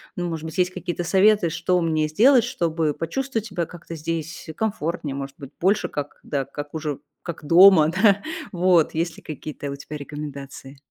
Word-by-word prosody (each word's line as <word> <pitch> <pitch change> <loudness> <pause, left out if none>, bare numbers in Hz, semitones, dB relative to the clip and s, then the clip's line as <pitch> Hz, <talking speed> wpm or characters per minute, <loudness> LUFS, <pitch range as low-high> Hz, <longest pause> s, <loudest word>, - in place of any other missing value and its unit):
ну, 175 0 -2
может 160 -2 -4
быть, 160 - -7
есть 180 0 +2
какие-то 180 -1 -4
советы, 190 0 +4
что 180 +2 +1
мне 160 -2 +1
сделать, 235 - +5
чтобы 165 - -1
почувствовать 230 - -2
себя 180 -6 -3
как-то 170 -1 -10
здесь 165 +1 -5
комфортнее, 170 -9 -2
может 135 0 -6
быть, 140 -1 -10
больше 195 +4 +2
как, 145 0 -5
да, 140 -2 -2
как 145 +2 -8
уже, 155 -3 -3 0.2
как 165 -3 -7
дома, 170 -1 +7
да? 200 +3 +3 0.3
Вот. 175 -3 +3
Есть 165 0 -1
ли - - -12
какие-то 150 -1 -6
у 140 - -4
тебя 140 +2 -9
рекомендации? 140 -2 -8
165 Hz, 175 wpm, -23 LUFS, 150-185 Hz, 0.3 s, дома